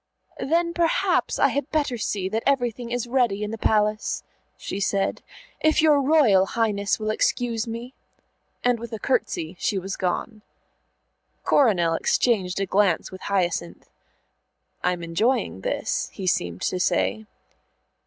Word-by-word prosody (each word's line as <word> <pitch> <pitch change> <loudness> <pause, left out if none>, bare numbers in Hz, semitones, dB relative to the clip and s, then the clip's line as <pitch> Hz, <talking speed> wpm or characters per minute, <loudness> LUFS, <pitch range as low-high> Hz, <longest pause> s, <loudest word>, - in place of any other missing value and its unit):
"Then 335 +3 +1
perhaps 340 -1 +1
I - - +4
had 285 -1 -2
better 290 -5 0
see 205 -4 -2
that 220 +3 -1
everything 245 -3 0
is 245 -1 -1
ready 240 -5 +1
in 210 - -3
the 225 - -4
Palace," 210 0 +1 0.3
she 195 - -5
said, 195 0 0 0.4
"if 315 0 +3
your 300 -2 +5
Royal 260 -10 +4
Highness 205 -3 0
will 215 0 -1
excuse 230 0 0
me." 235 +3 -6 0.7
And 245 -1 +2
with 235 +1 -8
a - - -2
curtsey 180 -8 -1
she 200 - 0
was 190 +1 -4
gone. 210 +4 -3 1.0
Coronel 185 - +3
exchanged 190 0 +1
a 195 - 0
glance 190 -2 +1
with 185 - -10
Hyacinth. 175 - -2 0.9
"I'm 180 -1 0
enjoying 215 +10 0
this," - - -2
he 195 - -7
seemed 90 - -1
to 180 - -1
say. 215 +3 0
215 Hz, 140 wpm, -24 LUFS, 190-250 Hz, 1.0 s, your